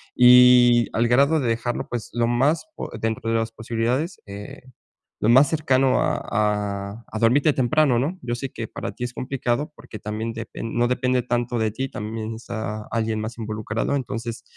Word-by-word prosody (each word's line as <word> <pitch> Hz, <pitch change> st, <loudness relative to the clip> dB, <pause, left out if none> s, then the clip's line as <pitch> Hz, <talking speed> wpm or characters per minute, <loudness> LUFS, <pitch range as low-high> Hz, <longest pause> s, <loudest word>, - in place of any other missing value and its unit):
y 125 Hz, -1 st, +7 dB
al 115 Hz, +1 st, +2 dB
grado 140 Hz, +6 st, +4 dB
de 130 Hz, -, -1 dB
dejarlo, 115 Hz, +1 st, -2 dB
pues, 120 Hz, -3 st, -4 dB
lo 120 Hz, 0 st, +1 dB
más 135 Hz, -, +1 dB
po -, -, -6 dB
dentro 115 Hz, 0 st, -2 dB
de 115 Hz, -, +2 dB
las 115 Hz, 0 st, -2 dB
posibilidades, 120 Hz, -, -2 dB
eh, 100 Hz, +1 st, -9 dB, 0.6 s
lo 110 Hz, -, +2 dB
más 130 Hz, +4 st, +7 dB
cercano 135 Hz, -4 st, +2 dB
a -, -, +1 dB
a 105 Hz, 0 st, -2 dB
a 110 Hz, -, -6 dB
dormirte 135 Hz, +7 st, +4 dB
temprano, 130 Hz, -1 st, +2 dB
¿no?, 160 Hz, +8 st, -2 dB
yo 120 Hz, -, -2 dB
sé 135 Hz, +2 st, -5 dB
que 115 Hz, -, -6 dB
para -, -, -6 dB
ti -, -, -7 dB
es 125 Hz, -, -6 dB
complicado, 130 Hz, +3 st, -2 dB
porque 110 Hz, -, -11 dB
también 110 Hz, +2 st, -4 dB
depen 115 Hz, 0 st, -6 dB
no 120 Hz, 0 st, +2 dB
depende 125 Hz, 0 st, +1 dB
tanto 120 Hz, -1 st, -1 dB
de 110 Hz, -1 st, +1 dB
ti, 130 Hz, +5 st, -3 dB
también 110 Hz, +1 st, -5 dB
está 110 Hz, -2 st, -5 dB
alguien 110 Hz, -1 st, -1 dB
más 110 Hz, +2 st, -6 dB
involucrado. 110 Hz, +3 st, -2 dB
Entonces, 115 Hz, -3 st, -4 dB
120 Hz, 180 wpm, -23 LUFS, 110-125 Hz, 0.6 s, y